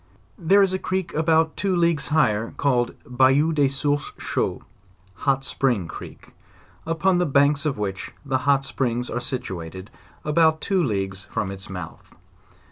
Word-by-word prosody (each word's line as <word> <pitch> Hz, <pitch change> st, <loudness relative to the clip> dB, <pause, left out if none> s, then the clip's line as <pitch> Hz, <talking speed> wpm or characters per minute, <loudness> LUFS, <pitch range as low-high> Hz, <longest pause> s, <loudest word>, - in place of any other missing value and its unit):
There 195 Hz, +4 st, +5 dB
is 190 Hz, -1 st, +1 dB
a 185 Hz, -, -1 dB
creek 190 Hz, -2 st, -2 dB
about 160 Hz, 0 st, +2 dB
two 195 Hz, -2 st, 0 dB
leagues 170 Hz, -4 st, +1 dB
higher 115 Hz, -7 st, +2 dB
up, -, -, -14 dB
called 125 Hz, -4 st, +1 dB
"Bayou 135 Hz, +6 st, +3 dB
des 145 Hz, -2 st, +3 dB
sources 145 Hz, +1 st, -1 dB
chauds," -, -, -2 dB, 0.5 s
(hot 135 Hz, +6 st, 0 dB
spring 120 Hz, -10 st, 0 dB
creek) -, -, -10 dB, 0.5 s
upon 170 Hz, +3 st, +2 dB
the 180 Hz, -, +1 dB
banks 140 Hz, +1 st, +3 dB
of 140 Hz, -, -1 dB
which 100 Hz, -2 st, -4 dB
the 135 Hz, -1 st, 0 dB
hot 135 Hz, -1 st, +3 dB
springs 125 Hz, -2 st, -2 dB
are 120 Hz, -, -1 dB
situated 95 Hz, -, -6 dB
at -, -, -19 dB
about 160 Hz, 0 st, +4 dB
two 190 Hz, 0 st, +1 dB
leagues 95 Hz, -6 st, -2 dB
from 95 Hz, -2 st, -3 dB
its 95 Hz, +1 st, -9 dB
mouth. 90 Hz, -3 st, -9 dB
140 Hz, 160 wpm, -23 LUFS, 110-160 Hz, 0.5 s, There